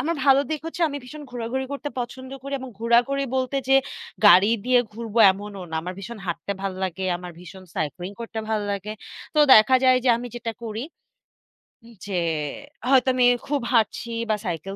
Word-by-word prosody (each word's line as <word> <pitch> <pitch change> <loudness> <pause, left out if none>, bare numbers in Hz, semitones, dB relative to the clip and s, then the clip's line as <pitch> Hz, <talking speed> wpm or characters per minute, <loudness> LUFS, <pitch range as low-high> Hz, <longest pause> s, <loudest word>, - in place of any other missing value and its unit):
আমার 335 +2 -1
ভালো 275 0 +6
দিক 310 -2 -2
হচ্ছে 335 +2 -4
আমি 285 - -5
ভীষণ 300 +4 -10
ঘোরাঘুরি 245 +2 -3
করতে 280 +1 -4
পছন্দ 260 +2 -7
করি 275 +1 -7
এবং 260 -1 -8
ঘোরাঘুরি 245 +4 +2
বলতে 260 +1 -1
যে 270 - +6 0.5
গাড়ি 205 +1 +7
দিয়ে 250 0 +4
ঘুরবো 230 0 -4
এমনও 200 0 -8
না। 160 - -5
আমার 180 +2 -5
ভীষণ 215 +3 -8
হাঁটতে 175 +3 -3
ভাল 195 - -2
লাগে। 190 0 -3
আমার 180 0 -9
ভীষণ 185 +2 -12
সাইক্লিং 175 +4 -3
করতে 230 -1 -6
ভালো 215 -1 0
লাগে। 200 +1 -4 0.4
তো - - +1 0.2
দেখা 215 +4 +6
যায় 255 0 +6
যে, 255 - +3
আমি 240 +1 -6
যেটা 230 -1 -4
করি 225 +3 -4 1.0
উম 235 0 -15
যে 195 -3 -2 0.7
হয়তো 265 -1 +5
আমি 250 - +4 0.2
খুব 285 -2 0
হাঁটছি 230 +1 +1 0.2
বা 215 - +3
সাইকেল 180 +3 -4
235 Hz, 185 wpm, -24 LUFS, 195-260 Hz, 1.0 s, গাড়ি